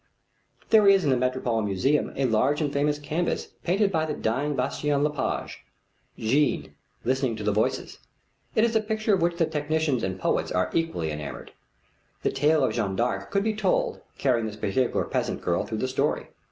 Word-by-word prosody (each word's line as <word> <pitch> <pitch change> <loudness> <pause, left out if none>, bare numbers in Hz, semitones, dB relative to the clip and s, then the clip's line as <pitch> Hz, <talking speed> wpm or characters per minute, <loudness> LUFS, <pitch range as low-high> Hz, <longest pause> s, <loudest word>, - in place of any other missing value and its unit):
There 215 -2 +6
is 195 -1 +6
in 145 - +2
the - - +4
Metropolitan 125 -3 0
Museum 130 +10 +1
a 135 - 0
large 130 +5 +2
and 145 -3 -1
famous 145 +1 +1
canvas 155 +4 -2
painted 195 +3 +2
by 160 -3 0
the 150 - -2
dying 140 +6 -1
Bastien 145 0 0
Lepage; 150 0 -2 0.5
Jeanne 140 +7 +1 0.3
Listening 130 -1 +1
to 110 - -6
the 105 - +2
Voices. 105 +2 -1 0.6
It 220 - +4
is 230 -1 +2
a 220 - +4
picture 215 0 0
of 190 - +2
which 170 0 +1
the 170 - +3
technicians 155 -3 0
and 95 0 -2
the - - -14
poets - - 0
are 90 0 0
equally 165 - -1
enamored. 75 -1 -7 0.7
The - - +2
tale 150 +2 +3
of 130 - +1
Jeanne 100 -5 -1
d'Arc 100 +1 -1
could 200 - +1
be 220 0 +1
told, 205 -3 0 0.2
carrying 120 -5 +1
this 105 - -6
particular 110 +4 0
peasant - - -2
girl 85 -1 0
through 110 - -3
the 130 - -1
story. 130 - -1
140 Hz, 190 wpm, -26 LUFS, 110-165 Hz, 0.7 s, There